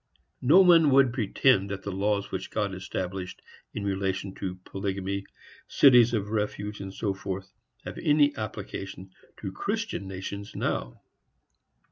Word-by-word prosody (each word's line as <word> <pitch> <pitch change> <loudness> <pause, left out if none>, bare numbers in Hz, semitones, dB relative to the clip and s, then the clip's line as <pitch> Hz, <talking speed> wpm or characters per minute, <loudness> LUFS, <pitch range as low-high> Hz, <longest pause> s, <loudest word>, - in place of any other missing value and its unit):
No 155 +9 +7
one 170 -4 +6
would 135 -3 +5
pretend 110 -3 +2
that 95 -1 -5
the 100 - -4
laws 100 +1 -1
which - - -4
God 105 -3 -1
established 95 0 -5 0.3
in 105 - -5
relation 95 -1 -2
to 95 -2 -5
polygamy, 100 0 -3 0.4
cities 125 -4 +6
of 105 -1 -2
refuge, 105 -1 -2
&c., 100 +1 -3 0.7
have - - -6
any 145 -1 +3
application 100 -3 -6 0.3
to 95 - -5
Christian 215 - -3
nations 100 +2 -6
now. - - -3
100 Hz, 125 wpm, -27 LUFS, 95-125 Hz, 0.7 s, No